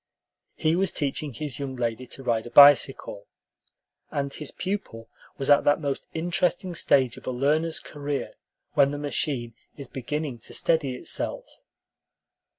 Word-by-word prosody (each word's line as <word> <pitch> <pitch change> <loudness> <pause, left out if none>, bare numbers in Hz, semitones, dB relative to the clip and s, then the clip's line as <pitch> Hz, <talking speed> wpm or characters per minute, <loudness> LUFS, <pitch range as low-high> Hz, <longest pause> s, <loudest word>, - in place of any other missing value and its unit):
He 155 +1 +1
was 190 0 +1
teaching 145 +1 -2
his 135 +2 -6
young 135 -2 -4
lady 120 0 -3
to 135 - -6
ride 115 -2 0
a - - -7
bicycle, 140 -7 +6 0.8
and 140 -1 -3
his 150 - -4
pupil 185 - -5 0.3
was 135 - -3
at 145 - +6
that 145 - +4
most 140 -3 -3
interesting 175 +2 0
stage 135 -6 +2
of - - -13
a - - 0
learner's 155 +6 +1
career 145 -1 -5 0.4
when 140 - +5
the 145 - -4
machine 140 -4 -2 0.2
is 140 - -8
beginning 140 0 -4
to - - -9
steady 150 -6 +1
itself. - - -3
140 Hz, 150 wpm, -26 LUFS, 130-155 Hz, 0.8 s, bicycle